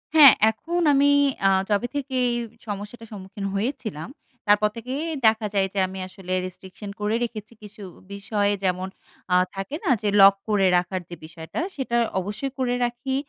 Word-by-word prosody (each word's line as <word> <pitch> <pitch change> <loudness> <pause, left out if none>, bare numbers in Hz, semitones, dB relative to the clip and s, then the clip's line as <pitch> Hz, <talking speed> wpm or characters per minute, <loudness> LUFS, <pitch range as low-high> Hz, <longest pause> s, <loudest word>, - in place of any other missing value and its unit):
হ্যাঁ। 285 -5 +10 0.2
এখন 340 +10 -3
আমি 285 +1 +4 0.4
আ - - +6 0.2
যবে 210 +4 +1
থেকে 275 -2 -3
এই 240 - 0 0.3
সমস্যাটা 210 +3 -6
সম্মুখীন 195 0 -7
হয়েছিলাম। 215 - -3 0.4
তারপর 210 +1 +4
থেকেই 255 +6 -4 0.2
দেখা 220 0 +2
যায় 195 -1 +2
যে 195 - -1
আমি 190 0 -8
আসলে 185 -1 -7
রেস্ট্রিকশন 185 +3 -9
করে 210 +2 0
রেখেছি। 220 -1 -6
কিছু 210 0 -11 0.3
বিষয় 205 0 -1
যেমন 185 0 0 0.5
আ - - +6 0.2
থাকে 195 +9 -5
না? - - -1
যে 210 - 0
লক 195 0 +9 0.2
করে 200 -2 +3
রাখার 180 +1 -2
যে 175 - -7
বিষয়টা। 160 - -7 0.2
সেটা 250 -4 -1 0.2
অবশ্যই 210 +8 -4
করে 245 -1 +1
রাখি। 240 +2 -3
210 Hz, 165 wpm, -24 LUFS, 195-245 Hz, 0.5 s, হ্যাঁ